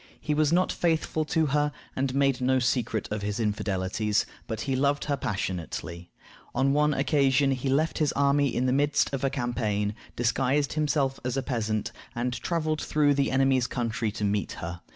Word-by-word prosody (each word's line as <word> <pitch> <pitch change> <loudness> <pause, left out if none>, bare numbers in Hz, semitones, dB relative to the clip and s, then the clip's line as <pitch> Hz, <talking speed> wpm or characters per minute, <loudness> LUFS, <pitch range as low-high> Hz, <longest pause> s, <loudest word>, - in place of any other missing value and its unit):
He 150 - -1
was 150 0 +2
not 180 +2 +3
faithful 160 -2 0
to 160 0 +1
her, 150 +1 +1 0.2
and 130 0 -1
made 135 -2 +2
no 130 +1 +3
secret 120 -3 0
of 105 0 -2
his 105 +1 -3
infidelities, 105 -1 0 0.2
but 110 -1 -4
he 135 -2 -1
loved 140 +2 +1
her 145 - 0
passionately. 90 - -4 0.5
On 135 +2 +2
one 150 0 +3
occasion 135 0 +3
he 130 0 -1
left 155 +5 +1
his 150 -3 +2
army 140 0 +3
in 130 -1 -1
the 130 - +2
midst 145 +1 +2
of 135 - -2
a 135 - +3
campaign, 110 -6 -1 0.2
disguised 130 +4 +1
himself 145 -3 0
as 125 +1 -2
a 135 - 0
peasant, 110 -5 -2 0.2
and 120 +1 -1
traveled 155 +1 -1
through 145 -1 +2
the 140 0 +1
enemy's 130 -1 +2
country 115 -3 -2
to 105 - -4
meet 100 0 0
her. 85 +1 -6
130 Hz, 180 wpm, -27 LUFS, 110-145 Hz, 0.5 s, not